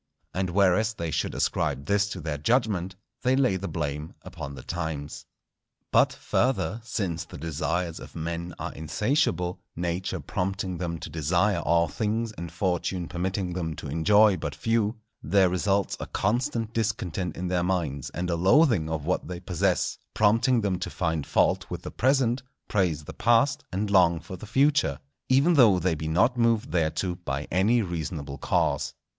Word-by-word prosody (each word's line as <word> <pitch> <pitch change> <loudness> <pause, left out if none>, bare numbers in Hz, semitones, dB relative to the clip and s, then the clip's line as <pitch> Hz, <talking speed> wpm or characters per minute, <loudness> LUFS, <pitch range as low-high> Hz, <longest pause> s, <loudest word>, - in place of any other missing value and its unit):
And 95 0 -1
whereas 100 +4 +3
they 85 -4 -3
should - - -1
ascribe 70 -2 0
this 100 0 +2
to 95 - -5
their 75 -3 -4
judgment, 95 - +1 0.3
they 130 +1 +3
lay 130 -7 +3
the 95 +1 -3
blame 75 -1 -4
upon 70 0 -7
the 65 - -10
times. 80 -4 -5 0.6
But, - - +5
further, 120 -2 0
since 95 -8 -2
the - - -11
desires 80 +3 -2
of - - -11
men 85 +1 -4
are - - -5
insatiable, 90 - 0 0.2
Nature 90 +2 -2
prompting 95 -1 -3
them 85 -2 -2
to 80 - -8
desire 85 +5 +1
all 85 0 +2
things 110 +6 -1
and 85 -5 -7
Fortune 90 -1 -1
permitting 90 +1 -2
them 80 -3 -3
to 75 - -7
enjoy 100 +6 +4
but 75 -3 -4
few, 115 -1 0 0.3
there 95 -2 +3
results 95 +2 0
a - - -5
constant 115 +1 -1
discontent 95 -6 -2
in 90 - -3
their 90 -1 +1
minds, 85 -7 -1
and 90 +1 -3
a - - +1
loathing 95 - +4
of 80 -2 -3
what 90 +2 -1
they 90 -1 -5
possess, 90 0 0 0.2
prompting 115 +3 +3
them 95 -4 -1
to - - -3
find 80 -5 -2
fault - - +2
with - - -5
the - - -6
present, 130 -1 +2 0.3
praise 90 -7 0
the - - -9
past, 130 +5 +2
and 100 +2 -2
long 85 -4 +5
for 95 - -8
the 100 +4 -10
future, 135 - +2 0.3
even 140 +7 +4
though 115 - +6
they 90 0 +1
be 80 0 -4
not 105 +11 +2
moved 115 -6 +2
thereto 85 +2 0
by 70 -1 -3
any 110 +6 +3
reasonable 80 -5 -4
cause. - - 0
90 Hz, 170 wpm, -26 LUFS, 80-110 Hz, 0.6 s, though